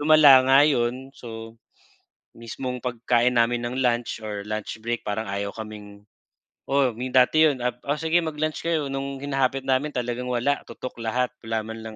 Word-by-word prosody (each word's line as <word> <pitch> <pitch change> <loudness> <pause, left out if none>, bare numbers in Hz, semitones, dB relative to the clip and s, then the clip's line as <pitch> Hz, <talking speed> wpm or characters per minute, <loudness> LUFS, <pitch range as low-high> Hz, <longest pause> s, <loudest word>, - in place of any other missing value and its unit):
lumala 145 -3 +7
nga 135 +1 +7
'yon, 130 -1 0
so, 115 -3 -9 0.8
mismong 125 +2 -5
pagkain 125 0 +1
namin 120 0 +2
ng 120 - -4
lunch 120 -2 0
or 105 -2 -5
lunch 110 +1 -4
break 120 0 -2
parang 105 +2 -3
ayaw 100 +1 -3
kaming 105 -2 -9 0.7
oo, 135 -3 +2
may 125 +3 -5
dati 130 +5 +4
'yon 135 -5 -2
ap 125 0 -2
"O, 145 +2 -2
sige 160 +2 +2
mag-lunch 155 -1 -3
kayo," 155 -4 -1
no'ng 135 0 -4
hinahapit 135 -1 0
namin 135 +3 +1
talagang 125 0 -3
wala 125 +4 0
tutok 125 -2 -8
lahat, 125 +3 -1
wala 115 -1 -3
man 115 0 -7
lang 110 -1 -8
125 Hz, 170 wpm, -24 LUFS, 115-135 Hz, 0.8 s, lumala